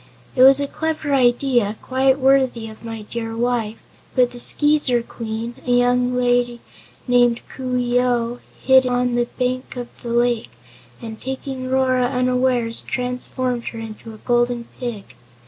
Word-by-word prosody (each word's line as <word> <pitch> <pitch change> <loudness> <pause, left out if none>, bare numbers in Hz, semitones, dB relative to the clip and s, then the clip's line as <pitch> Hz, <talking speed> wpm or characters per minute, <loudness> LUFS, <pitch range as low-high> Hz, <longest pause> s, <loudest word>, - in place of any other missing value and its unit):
It 255 - +2
was 270 +1 +8
a 285 - 0
clever 310 0 -2
idea, 245 -4 +2
quite 265 +1 +2
worthy 265 -4 +2
of 220 - -14
my 225 -2 -6
dear 225 +1 -5
wife, 230 -2 -1 0.4
but 250 -1 +3
the 245 - -9
Skeezer 290 -3 +3
Queen 230 0 -5
a - - -2
young 245 0 +2
lady 245 -1 +1 0.5
named 245 -1 +3
Coo 255 -1 -3
ee 245 0 +1
oh 245 -1 0 0.2
hid 260 -1 +5
on 245 0 0
the 240 0 +1
bank 255 +1 -2
of 245 -1 -5
the 240 - -6
lake 240 -1 +1 0.5
and 220 -1 -8
taking 265 0 -5
Rora 260 -1 +2
unawares, 250 -2 0
transformed 250 -1 -3
her 230 - -5
into 225 0 -8
a - - -19
Golden 240 0 +1 0.2
Pig. 235 -5 -4
245 Hz, 150 wpm, -21 LUFS, 235-255 Hz, 0.5 s, was